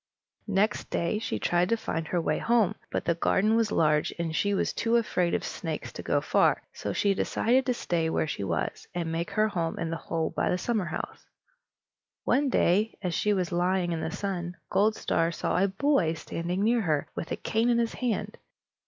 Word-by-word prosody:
Next 205 +1 +1
day 170 +5 0
she 225 - -2
tried 175 +1 +1
to 230 - +2
find 165 -7 -3
her 175 - 0
way 155 -2 0
home, 225 -4 +3 0.2
but - - -2
the 170 - +3
garden 195 +6 +2
was 225 -2 +2
large, 150 -1 +2
and 165 -2 -2
she 200 +3 +1
was - - 0
too 230 +1 +1
afraid 185 -7 +1
of - - -2
snakes - - -4
to - - -6
go - - +1
far; - - +2
so - - -4
she 200 -1 +2
decided 245 +6 +1
to 250 - +3
stay 165 -7 0
where 160 - +1
she 150 - -4
was, 95 - -2
and 170 -2 -2
make 165 +1 -2
her 215 0 +2
home 165 -4 -2
in 165 - -2
the 165 - -2
hole 160 +1 -2
by - - +1
the 180 - +1
summerhouse. 195 -6 -3 1.0
One 275 +2 +2
day, 210 -1 +2
as 180 -2 -1
she 210 - +1
was 185 -4 0
lying 180 0 +1
in 165 -1 -2
the - - -2
sun, 180 -1 -4
Goldstar 195 -4 +2
saw - - -2
a - - +4
boy 195 - +1
standing 175 +4 -3
near 230 +2 +3
her, 155 -7 0
with - - -5
a - - +1
cane 225 +2 0
in 240 - +3
his 235 -1 0
hand. 245 -4 -2
185 Hz, 205 wpm, -28 LUFS, 170-220 Hz, 1.0 s, a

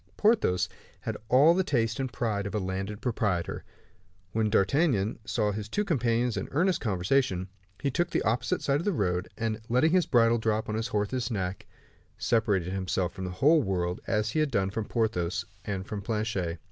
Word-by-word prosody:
Porthos 210 - +3 0.3
had - - -3
all 140 +7 +6
the 190 +2 +2
taste 115 -8 0
and 130 -2 -2
pride 105 -3 -1
of 100 - -5
a - - +1
landed 95 +2 -4
proprietor. 105 -8 -1 0.7
When 110 0 +1
D'Artagnan 110 - +2
saw 105 -2 0
his 105 +1 -5
two 210 - 0
companions 120 - +1
in - - -3
earnest 180 +5 +1
conversation, 95 -1 +1 0.3
he 140 - -1
took 175 +6 0
the - - 0
opposite 120 +4 0
side 140 +1 +2
of - - -5
the 205 - +2
road, 90 - -1
and 110 -1 -2
letting 125 +7 +3
his 180 -1 +3
bridle 115 -2 +4
drop 110 -1 0
upon 105 - -4
his 110 +1 -1
horse's 115 +4 -1
neck, 95 -4 -3 0.5
separated 100 -6 +1
himself 95 -1 -1
from 95 - -5
the - - -3
whole 150 - +4
world, 90 -5 -1
as 110 0 0
he 155 - 0
had 155 -1 +2
done 95 -6 0
from 110 +1 -3
Porthos 90 -8 -1 0.2
and 95 -2 -3
from 105 0 -5
Planchet. 105 -6 -2
110 Hz, 185 wpm, -28 LUFS, 95-125 Hz, 0.7 s, all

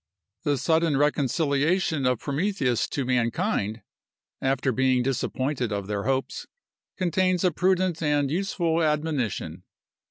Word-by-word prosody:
The 145 -1 0
sudden 160 +2 +2
reconciliation 145 +2 +1
of 125 -1 +2
Prometheus 145 - 0
to 140 - -2
mankind, 115 -3 0 0.6
after 135 0 +1
being 130 0 +2
disappointed 130 -1 -1
of 100 -1 -2
their 100 0 -3
hopes, 135 +1 -2 0.5
contains 185 0 +1
a 180 - +3
prudent 185 0 +1
and 145 -3 +1
useful 170 -2 0
admonition. 145 - -1
140 Hz, 115 wpm, -25 LUFS, 125-165 Hz, 0.6 s, a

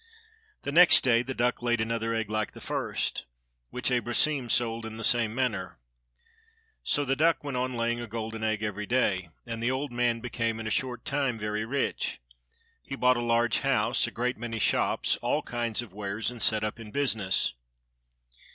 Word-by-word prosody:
The - - -3
next 175 +2 +8
day 120 -2 +4
the 130 +2 -5
duck 125 +1 0
laid 120 -1 +1
another 115 0 -1
egg 115 -2 -1
like 110 0 -2
the - - -11
first, - - -2 0.4
which 125 +1 -1
Abrosim 125 +2 +2
sold 115 0 +1
in 110 0 -7
the 115 - -6
same 115 -2 +2
manner. 115 -8 -2 1.0
So 145 - +1
the 135 0 +1
duck 160 +3 +2
went 140 -3 -4
on 125 0 -1
laying 120 0 -1
a 120 - -6
golden 110 0 -5
egg 110 -1 0
every 105 -1 -3
day, 95 -8 +1 0.2
and 115 -1 -5
the 120 - +1
old 130 +2 -2
man 120 -1 +1
became, 115 -1 -2
in 110 - -6
a 110 - -3
short 125 +2 -2
time, 135 -4 0
very 105 0 -2
rich. 135 +4 -2 0.6
He 135 - -6
bought 125 -1 +4
a - - -1
large 120 -1 +2
house, - - +1
a - - -4
great 125 +2 -2
many 115 -1 -4
shops, 110 - +2
all - - -1
kinds 120 -1 -2
of 105 -6 -14
wares, 105 +3 -3
and 120 -2 -10
set 110 0 +3
up 110 +2 -3
in 110 -2 -9
business. 110 - 0
115 Hz, 190 wpm, -28 LUFS, 110-125 Hz, 1.0 s, next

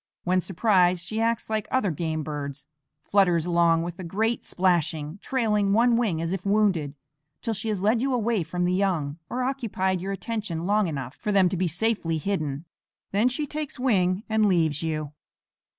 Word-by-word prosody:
When 185 +1 +2
surprised 180 -2 +2
she 220 +4 -3
acts 230 0 0
like 215 -1 -2
other 260 -8 +1
game 160 0 -2
birds, 145 -2 -5 0.4
flutters 180 -5 +3
along 170 -1 +3
with 175 +2 -6
a - - -5
great 220 +7 -1
splashing, 170 -2 0
trailing 210 -6 +1
one 235 +2 +4
wing 215 -9 +1
as 165 +2 -2
if 190 -2 -4
wounded, 195 -8 +1 0.5
till 230 - -1
she 220 +2 -4
has 200 -3 -2
led 225 +3 +3
you 270 +1 0
away 235 -4 +1
from 175 +2 -2
the 180 - +1
young, 175 -6 0
or 250 +1 -2
occupied 210 -9 -1
your 195 +2 -3
attention 195 -5 -4
long 205 0 +2
enough 135 -5 -4
for 210 - -2
them 195 -3 +4
to 190 - -2
be 180 0 0
safely 175 -1 0
hidden; 155 -4 -2 0.5
then 210 +5 +3
she 295 +4 -2
takes 300 0 -5
wing 195 -6 +2
and 220 -1 +2
leaves 160 -6 +2
you. 155 -3 -3
190 Hz, 180 wpm, -26 LUFS, 165-220 Hz, 0.5 s, one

